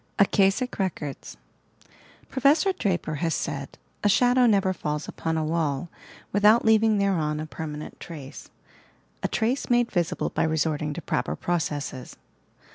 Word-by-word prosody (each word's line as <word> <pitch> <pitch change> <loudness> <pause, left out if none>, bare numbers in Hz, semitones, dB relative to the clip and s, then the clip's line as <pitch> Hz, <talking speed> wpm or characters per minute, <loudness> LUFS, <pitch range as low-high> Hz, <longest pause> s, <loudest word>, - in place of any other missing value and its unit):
"akasic 200 +5 +2
records" 150 - -4 0.9
Professor 285 +9 +3
Draper 180 - -1
has 165 -2 +1
said: 140 0 -4 0.3
"A 205 - +4
shadow 245 +4 +4
never 195 -4 +3
falls 150 -3 -3
upon 160 0 -3
a 160 - 0
wail 155 -1 -1 0.4
without 210 +4 +5
leaving 220 -1 +4
thereon 165 -7 0
a 155 - -3
permanent 155 -1 -7
trace 145 -5 -9 0.4
— - - -36
a - - 0
trace 240 +4 -1
made 240 -1 +3
visible 175 -4 -1
by - - -1
resorting 155 -1 0
to 170 - -6
proper - - -1
processes. 145 -6 -3
175 Hz, 135 wpm, -25 LUFS, 150-215 Hz, 0.9 s, without